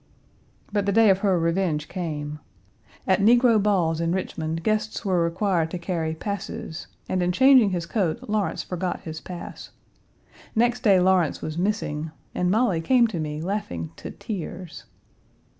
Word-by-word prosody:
But 205 -1 0
the - - +3
day 220 0 +6
of 190 - +2
her 195 -3 +2
revenge 165 -2 0
came. 150 -4 -4 0.7
At 190 - +3
negro 235 0 +5
balls 175 -6 +1
in 165 +1 0
Richmond, 165 -3 -3
guests 215 +1 -1
were 180 -3 +2
required 170 -1 0
to 180 - -4
carry 170 -2 -2
"passes," 200 -3 -5 0.2
and, 185 - 0
in 175 0 +1
changing 260 +1 +6
his 175 -3 -2
coat 200 +5 -1
Lawrence 210 -1 -1
forgot 180 0 -3
his 160 -1 -7
pass. 180 -1 -8 0.9
Next 240 +2 +2
day 200 -6 +5
Lawrence 180 -3 +2
was 155 - -4
missing, 170 -5 -1 0.2
and 180 - 0
Molly 210 -5 +2
came 245 +7 +4
to 180 -6 -4
me 150 0 -3
laughing 125 - -3
to - - -7
tears. 180 -4 -7
185 Hz, 155 wpm, -24 LUFS, 165-210 Hz, 0.9 s, day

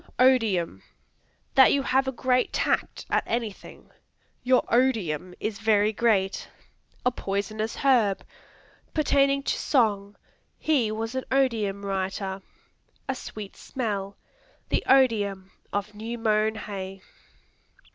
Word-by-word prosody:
Odium 220 - +3 0.7
That 265 - +7
you 280 - +2
have 265 0 +2
a - - +1
great 255 0 +1
tact - - -1
at - - +3
anything; 225 -3 -5 0.5
"Your 255 0 +3
odium 190 - +1
is 215 -1 -3
very 215 -1 +3
great." 200 -4 +1 0.6
A 250 - +4
poisonous 215 0 -3
herb. 235 -8 +2 0.7
Pertaining 275 -2 +3
to - - 0
song; 205 -6 +1 0.4
"He 260 -9 +1
was 225 +2 -3
an 260 0 -3
odium 220 -7 +1
writer." 190 0 -3 0.7
A 265 - 0
sweet 215 -5 -8
smell; 200 -6 -4 0.5
"The - - 0
odium 205 -8 +3 0.2
of 205 +1 -3
new 225 +3 -5
mown 220 -1 +1
hay." 195 -3 -6
220 Hz, 115 wpm, -26 LUFS, 200-255 Hz, 0.7 s, That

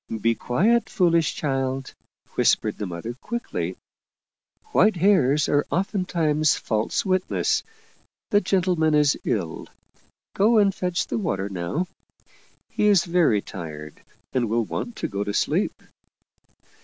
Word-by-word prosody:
" - - -5
Be 115 +2 +3
quiet, 195 - +1
foolish 170 -4 +2
child," 135 -2 -2 0.4
whispered - - +1
the 105 - -3
mother 90 +7 -5
quickly. 235 - -4 0.5
" 435 - -36
White 215 -1 +4
hairs 155 -6 +3
are 145 0 +1
oftentimes 170 -5 +1
false 110 - -1
witnesses. 185 -1 0 0.7
The 205 - +4
gentle 185 -1 +1
man 160 -1 +3
is 150 -2 +4
ill. - - -2 0.7
Go 220 +4 +4
and 200 -2 +4
fetch 180 -2 -1
the - - -3
water 100 - -2
now. 95 - -2 0.9
He 210 - +1
is 200 -4 +4
very 170 - +2
tired 75 -4 -8 0.3
and 120 -4 0
will 115 0 +1
want 240 - -5
to - - -3
go 100 -2 -3
to 105 0 -4
sleep." - - 0
155 Hz, 135 wpm, -24 LUFS, 115-185 Hz, 0.9 s, White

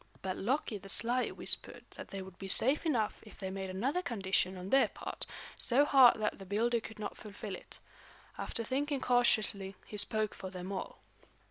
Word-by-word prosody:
But 185 -1 -2
Loki 230 -1 -1
the 195 - -12
sly 245 +5 +2
whispered - - -1
that - - -9
they 195 -1 -6
would 185 -1 -13
be 195 - -6
safe 270 - +4
enough 230 -9 0
if 215 - -15
they 190 -1 -4
made 190 0 -4
another 255 - 0
condition 190 - 0
on 185 +2 -7
their 270 0 +6
part, - - -4 0.3
so 265 +4 +4
hard 265 -5 +7
that 210 -1 -1
the - - -8
builder 230 +4 +1
could 220 -1 -10
not 210 - -5
fulfill 205 -1 -7
it. - - -4 0.6
After 230 - -4
thinking 280 +4 -1
cautiously, 215 -6 +2
he 210 - -8
spoke 215 +1 +1
for 190 - -7
them 185 +1 -6
all. 190 - -5
215 Hz, 190 wpm, -33 LUFS, 195-245 Hz, 0.6 s, hard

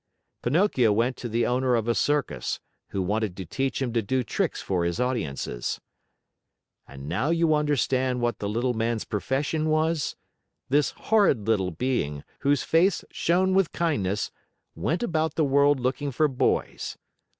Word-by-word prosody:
Pinocchio 130 - +3
went 120 +5 +1
to 120 - -5
the 115 +2 +1
owner 125 0 +2
of 115 -1 -1
a 120 - +3
circus, 135 - 0 0.3
who 95 - -2
wanted 105 0 -1
to 95 - -5
teach 135 - -2
him 125 -4 -2
to 115 - +2
do 130 +5 0
tricks - - -1
for 90 -3 -1
his 85 0 -1
audiences. 95 - -2 1.1
And 70 0 -10
now 110 - 0
do 170 - +3
you 165 -1 +3
understand 130 -4 +1
what 120 0 -1
the 100 - -2
Little 120 +4 0
Man's 115 0 -1
profession 145 +8 -1
was? 155 0 +1 0.5
This 145 +2 +3
horrid 195 - +2
little 100 -5 +2
being, 80 - -2 0.2
whose 140 0 +2
face 175 +3 +3
shone 185 +3 +2
with 190 -3 +2
kindness, 105 - 0 0.4
went 160 - -1
about 160 -6 0
the 155 - +2
world 140 0 +4
looking 135 +3 -1
for 155 +5 +2
boys. 130 -3 -1
130 Hz, 160 wpm, -26 LUFS, 110-150 Hz, 1.1 s, world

